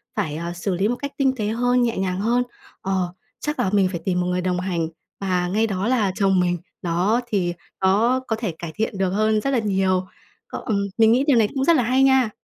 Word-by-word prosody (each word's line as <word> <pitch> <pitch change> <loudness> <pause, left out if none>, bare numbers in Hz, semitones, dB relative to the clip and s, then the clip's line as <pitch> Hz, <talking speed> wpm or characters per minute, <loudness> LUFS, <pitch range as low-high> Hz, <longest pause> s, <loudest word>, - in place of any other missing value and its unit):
phải, 150 -1 -2
à, 170 +2 -4
xử 180 +2 -2
lý 195 +4 +1
một 245 - 0
cách 280 +2 -5
tinh 265 -2 +2
tế 210 -3 -2
hơn, 245 +3 +2
nhẹ 235 -3 0
nhàng 185 -1 -1
hơn. 240 +4 +2 0.4
Ờ, 185 -2 -1 0.3
chắc 300 +1 -3
là 190 - +2
mình 195 -2 +4
phải 170 - -3
tìm 180 -2 +1
một 180 - -1
người 180 0 0
đồng 180 0 -1
hành 175 -3 -1 0.3
và 180 -2 0
ngay 215 +5 +1
đó 200 +1 -2
là 220 -7 +2
chồng 195 -2 +2
mình, 175 0 +1 0.2
đó, 185 +8 +1
thì 185 -6 0 0.3
nó 220 +7 +3
có 225 - 0
thể 220 -4 -3
cải 170 -2 -5
thiện 215 -2 -2
được 190 -1 +1
hơn 215 +2 +1
rất 275 - -1
là 255 - +2
nhiều. 190 -3 +1 0.4
Cọ - - -6
ừm, 200 -3 0
mình 225 0 +5
nghĩ 255 +3 +3
điều 270 -5 +5
này 215 -2 +4
cũng 270 - 0
rất 335 - +5
là 255 - +3
hay 255 +3 +3
nha! 265 -3 +4
200 Hz, 245 wpm, -22 LUFS, 185-240 Hz, 0.4 s, mình